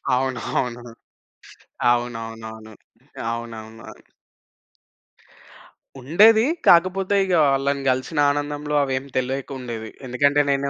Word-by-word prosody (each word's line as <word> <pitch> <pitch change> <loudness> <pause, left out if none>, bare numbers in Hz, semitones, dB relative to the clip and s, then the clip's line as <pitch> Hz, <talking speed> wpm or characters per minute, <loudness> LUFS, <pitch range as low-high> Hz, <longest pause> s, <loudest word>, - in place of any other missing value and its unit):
అవునవును. 125 -2 -2 1.1
అవునవునవును. 115 -2 -5 0.6
అవునవును. 115 -1 -8 2.1
ఉండేది. 215 - +5 0.2
కాకపోతే 185 +3 +4
ఇగ 185 - -1 0.2
వాళ్ళని 135 0 0
గలిసిన 130 +4 -3
ఆనందంలో 145 +1 -3
అవేం 130 0 -3
తెలియకుండేది. 125 -4 -4 0.2
ఎందుకంటే 145 +3 +2
నేను 140 0 0
130 Hz, 75 wpm, -22 LUFS, 120-145 Hz, 2.1 s, ఉండేది